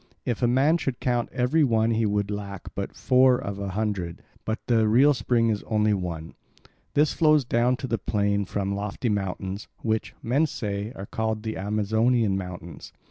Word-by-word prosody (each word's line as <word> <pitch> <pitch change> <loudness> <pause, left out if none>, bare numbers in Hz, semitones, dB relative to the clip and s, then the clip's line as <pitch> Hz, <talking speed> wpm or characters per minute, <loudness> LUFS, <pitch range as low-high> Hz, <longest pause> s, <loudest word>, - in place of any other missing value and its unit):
If 120 -4 -2
a 120 - +4
man 135 +7 +3
should 135 -6 -3
count 120 -2 0
every 130 +5 +2
one 115 -3 +2
he 110 -1 +1
would 100 0 0
lack 100 -2 -6
but - - -5
four 130 0 +4
of 100 -4 -5
a 100 - -3
hundred, 95 -4 -3 0.2
but 110 +1 -1
the 115 -3 +3
real 130 +7 +5
spring 115 -1 +1
is 105 -2 0
only 105 -1 +2
one. 85 -4 -4 0.6
This 150 +1 +3
flows 155 -4 +4
down 120 +1 +2
to 130 - -5
the 115 -3 -1
plain 100 0 0
from 100 +1 -2
lofty 105 +4 -3
mountains, 95 -1 -3 0.2
which, 110 -1 -1
men 140 +7 +2
say, 105 -4 -4
are 95 - -6
called 110 0 -2
the 110 -1 -3
Amazonian 110 +2 +1
mountains. 90 -4 -7
110 Hz, 180 wpm, -25 LUFS, 100-125 Hz, 0.6 s, real